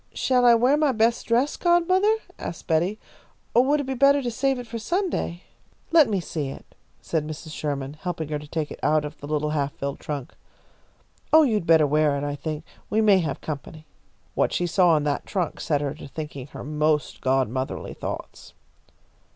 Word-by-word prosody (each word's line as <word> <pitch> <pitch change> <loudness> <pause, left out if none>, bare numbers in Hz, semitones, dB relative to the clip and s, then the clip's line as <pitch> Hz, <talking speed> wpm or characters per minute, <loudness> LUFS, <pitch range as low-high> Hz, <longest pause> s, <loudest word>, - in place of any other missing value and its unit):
"Shall 250 -1 +2
I 235 - +8
wear 250 +5 +4
my 300 -2 +3
best 230 +1 +1
dress, 245 +5 +2
godmother?" 370 +5 +3 0.2
asked 165 - -6
Betty, 175 +6 +1 0.6
"or 240 - +6
would 295 +2 +2
it - - -5
be 265 - -2
better 275 +2 +4
to 240 - -2
save 270 +3 0
it 245 - -6
for 230 0 -6
Sunday?" 340 - -2 0.5
"Let 315 -7 +6
me 200 -3 +1
see 155 -4 -4
it," - - -11 0.3
said 155 -2 -1
Mrs. 155 +1 -7
Sherman, 140 -3 -3
helping 160 -1 -5
her 150 -1 -2
to 150 - -11
take 155 0 -3
it - - -8
out 155 0 +2
of 150 0 -8
the 145 - -8
little 150 0 -1
half 145 -2 -1
filled 140 0 -4
trunk. 145 -4 -5 1.0
"Oh, 315 0 +8
you'd 215 - 0
better 160 -2 +6
wear 150 0 +2
it, 140 - -3
I 145 0 -2
think. 155 +1 -5 0.3
We 215 - +1
may 210 -3 +5
have 155 -5 -3
company." 155 +1 -7 0.5
What - - +1
she 175 - 0
saw 175 -1 +4
in 150 - -1
that 145 -1 -2
trunk 180 -5 -2
set 145 -3 0
her 145 -1 -2
to 155 - -10
thinking 140 -1 -7
her - - -9
most 150 +1 0
godmotherly 130 0 -1
thoughts. - - -7
160 Hz, 195 wpm, -24 LUFS, 150-240 Hz, 1.0 s, I